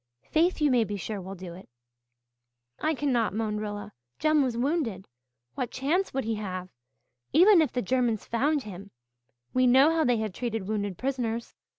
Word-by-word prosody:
Faith, 335 +3 +2
you 300 -2 +3
may 245 -2 +4
be 205 -1 -4
sure, 200 +1 -5
will 190 +2 -7
do 180 -2 -8
it." 185 -3 -13 1.1
"I 315 0 0
cannot," 245 -7 0
moaned 215 -1 -1
Rilla, 205 -1 -5 0.2
"Jem 310 -1 +3
was 250 -4 0
wounded 240 - -1 0.5
what 245 - -3
chance 320 +9 0
would 270 0 -2
he 225 - -1
have? 185 -2 -5 0.6
Even 360 +4 +7
if 300 -6 +1
the 250 - -2
Germans 240 -1 0
found 280 +5 +1
him 200 -1 -9 0.6
we 255 0 +4
know 265 +5 +6
how 325 -1 +2
they 245 -3 +2
have 215 -3 -3
treated 225 -4 -3
wounded 205 -3 -2
prisoners. 240 -3 -2
235 Hz, 175 wpm, -27 LUFS, 205-280 Hz, 1.1 s, Even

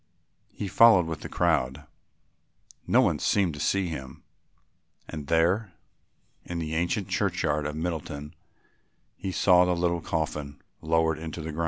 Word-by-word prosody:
He 100 - -5
followed 100 -3 +6
with 80 -2 -5
the - - -7
crowd, 65 +4 0 1.0
no 125 - +5
one 90 - +1
seemed 95 +3 +1
to 75 - -8
see 95 +5 +1
him, 65 -6 -7 0.8
and 75 -3 -7
there, 90 +5 +1 0.7
in 85 - -6
the 80 -1 -3
ancient 85 +5 -1
churchyard 80 -6 0
of 75 - -5
Middleton, 75 -2 -4 0.8
he 95 - -5
saw 90 -1 +5
the 90 0 +1
little 85 0 0
coffin 75 -3 -3 0.2
lowered 80 0 +1
into 80 +1 -6
the 80 0 -5
ground. 75 - -7
80 Hz, 145 wpm, -27 LUFS, 75-90 Hz, 1.0 s, followed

